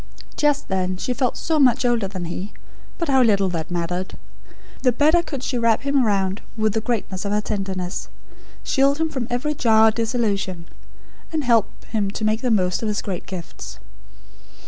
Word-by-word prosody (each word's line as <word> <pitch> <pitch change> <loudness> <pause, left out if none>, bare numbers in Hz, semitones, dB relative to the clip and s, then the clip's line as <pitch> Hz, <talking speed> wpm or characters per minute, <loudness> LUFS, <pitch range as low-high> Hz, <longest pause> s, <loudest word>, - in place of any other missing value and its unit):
Just 295 -1 +1
then 185 -1 -1
she 250 - -2
felt 250 0 0
so 320 -2 0
much 250 -3 +4
older 235 -5 +2
than 185 -2 -5
he; 180 +4 -5 0.4
but 335 - -2
how 265 -2 +4
little 200 -5 +3
that 165 -3 -3
mattered. 175 +1 -3 0.6
The 250 - +4
better 305 +7 +4
could 280 -6 -6
she 250 -3 -1
wrap 230 0 +2
him 280 -1 +2
round 195 -2 0 0.2
with 215 -1 +1
the 220 - 0
greatness 215 -5 -2
of 200 - -2
her 210 - +2
tenderness; 190 -3 -3 0.5
shield 275 +1 +3
him 320 0 0
from 260 -6 -3
every 250 +5 -1
jar 225 -5 +5
or - - 0
disillusion; 210 -6 -1 0.7
and 315 -2 -1
help 235 -4 +3 0.2
him 210 -3 -1
to 215 +2 -3
make 215 +1 +1
the 250 - 0
most 185 -5 +2
of 225 - -1
his 210 -1 -1
great 185 -4 -5
gifts. 180 -3 -7
220 Hz, 185 wpm, -22 LUFS, 190-255 Hz, 0.7 s, jar